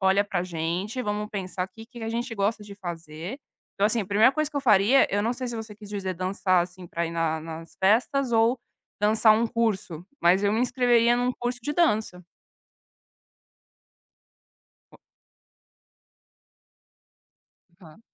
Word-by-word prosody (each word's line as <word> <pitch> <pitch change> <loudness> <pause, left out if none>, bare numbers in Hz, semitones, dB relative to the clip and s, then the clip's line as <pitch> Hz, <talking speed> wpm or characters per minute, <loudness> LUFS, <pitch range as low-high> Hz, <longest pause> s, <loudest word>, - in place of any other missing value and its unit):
olha 190 +1 +3
pra 195 -4 -2
gente, 180 +7 -3
vamos 210 -1 -3
pensar 185 -2 -4
que 225 +4 -13
que 240 0 -12
a 225 - -3
gente 235 +1 -3
gosta 210 +1 -1
de 205 -1 -10
fazer". 170 - -7 0.4
Então 200 - +2
assim, 230 +2 +1
a - - -9
primeira 210 +5 +5
coisa 310 +1 -1
que 295 - -7
eu - - +1
faria, 230 +1 +5
eu 205 - +2
não 230 +3 0
sei 250 0 -4
se 235 - -4
você 220 -1 -7
quis 210 0 -13
dizer 195 -2 -4
dançar 185 0 +1
assim, 180 0 -9
para 170 0 -3
ir - - -5
na 165 -1 -1
nas 165 +1 -9
festas 240 +6 +2
ou 230 +2 +3 0.4
dançar 215 +1 +5
um 230 +2 +1
curso, 205 -8 -2 0.2
mas 185 +4 +4
eu 200 - +2
me 220 - +1
inscreveria 245 -1 +3
num 245 +1 0
curso 245 0 -3
de 290 +5 -3
dança. 220 - +1 2.7
Po - - -17 2.8
Tá. 160 -3 -16
210 Hz, 160 wpm, -26 LUFS, 185-235 Hz, 2.8 s, primeira